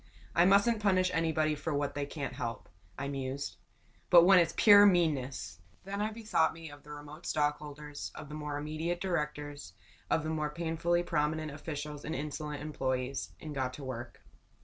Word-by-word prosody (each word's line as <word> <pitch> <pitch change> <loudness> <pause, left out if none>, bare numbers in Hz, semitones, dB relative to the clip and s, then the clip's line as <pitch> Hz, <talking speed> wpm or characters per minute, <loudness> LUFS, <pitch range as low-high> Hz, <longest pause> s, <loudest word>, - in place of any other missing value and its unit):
"I 170 - +5
mustn't 200 +4 +4
punish 185 -3 +3
anybody, 160 -2 +1
for 150 +1 -3
what 145 0 -1
they 145 0 -3
can't 145 -2 -5
help," 115 -1 -5 0.3
I 140 - -3
mused. 135 -8 -4 0.5
"But 170 -1 +9
when 185 +1 +7
it's 170 -1 +1
pure 205 -2 +9
meanness!" 135 - +1 0.2
Then 200 +1 -4
I 215 - +1
bethought 215 -8 +1
me 165 -2 -9
of 145 0 -12
the 150 - -17
remote 150 +3 -9
stockholders, 150 -1 -2
of 150 - -8
the 150 - -9
more 150 -1 -4
immediate 155 +4 -2
directors, 150 - -3 0.4
of 160 - +2
the 155 -1 -1
painfully 170 +1 0
prominent 155 -1 -1
officials 150 0 -6
and 160 - -3
insolent 150 +1 -4
employees 130 -3 -2
and 155 -1 -7
got 130 -2 -2
to 145 - -9
work. 125 -2 -7
150 Hz, 170 wpm, -32 LUFS, 145-170 Hz, 0.5 s, But